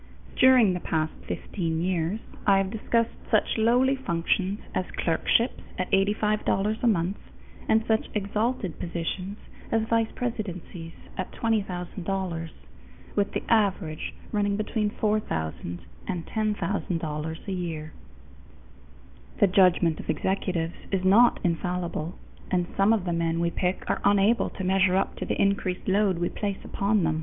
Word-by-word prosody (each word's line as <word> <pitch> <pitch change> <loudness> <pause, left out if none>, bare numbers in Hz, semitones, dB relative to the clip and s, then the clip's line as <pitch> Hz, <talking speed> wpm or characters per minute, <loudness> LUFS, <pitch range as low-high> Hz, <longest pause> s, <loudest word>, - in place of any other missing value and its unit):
During 255 -7 +6
the 180 - -2
past 160 -2 -1
fifteen 165 -5 -2
years, 180 +3 0 0.3
I 195 -1 +6
have 195 0 0
discussed 230 +1 +1 0.2
such - - +2
lowly 245 +4 +4
functions 190 -3 0
as 185 - 0
clerkships 200 +8 +1 0.2
at 185 - -2
$85 210 +1 +1
a 245 - +2
month 190 -2 +1 0.5
and 220 0 +4
such 220 -1 +1
exalted 210 - -1
positions 180 +4 -4 0.3
as 225 -1 +1
vice 230 -1 +2
presidencies 180 -8 -4 0.3
at 185 - -3
$20,000, 185 -5 -2 0.7
with 205 -1 +1
the - - -2
average 195 -8 +1 0.2
running 205 -1 +1
between 215 0 0
$4000 90 - -2 0.3
and 175 -4 -3
$10,000 170 -7 -2
a - - -2
year. 165 -4 -4 1.5
The - - +7
judgment 180 -4 +4
of - - -9
executives 175 -1 -1 0.2
is 190 -2 0
not 225 +6 +6
infallible, 175 -1 -2 0.3
and 180 -2 +1
some 195 +2 +4
of 215 -5 +2
the 175 - 0
men 165 0 0
we 170 0 +1
pick 180 +1 -1
are - - 0
unable 205 +3 +4
to 190 - -6
measure 190 0 +3
up 195 - 0
to - - -3
the - - -1
increased 195 -2 0
load 195 -1 +3
we 175 0 0
place 200 -2 -3
upon 200 -1 +1
them. 160 -1 +1
190 Hz, 140 wpm, -27 LUFS, 170-210 Hz, 1.5 s, The